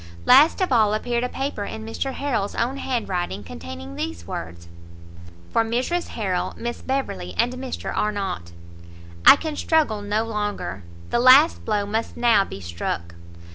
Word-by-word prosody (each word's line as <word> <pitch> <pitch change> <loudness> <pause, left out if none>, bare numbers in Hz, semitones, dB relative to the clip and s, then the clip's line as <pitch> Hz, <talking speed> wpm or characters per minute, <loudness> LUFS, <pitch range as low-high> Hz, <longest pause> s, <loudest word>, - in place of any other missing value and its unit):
Last 285 +9 +6
of 370 - +1
all 215 -3 +4
appeared 240 +2 -1
a 250 - -1
paper 270 -6 -3
in 220 +2 -6
Mr 265 +4 -3
Harrel's 240 -9 -2
own 255 +4 -1
hand 250 -4 -2
writing, 175 - -3
containing 85 +1 -8
these 85 -1 -5
words. 85 0 -7 0.8
For 230 - +3
Mrs 255 +10 -1
Harrel, 185 -4 -1
Miss 240 0 -5
Beverley, 95 - -3
and 245 +1 +2
Mr 255 0 -5
Arnott. 195 - -2 0.8
I - - +12
can 315 -2 -4
struggle 295 -10 +1
no 205 +2 0
longer, 205 - -3 0.3
the 240 - +2
last 260 +6 +6
blow 210 -2 0
must 220 +3 -3
now 230 -4 +4
be 100 - -8
struck! 85 0 -4
215 Hz, 155 wpm, -23 LUFS, -, 0.8 s, I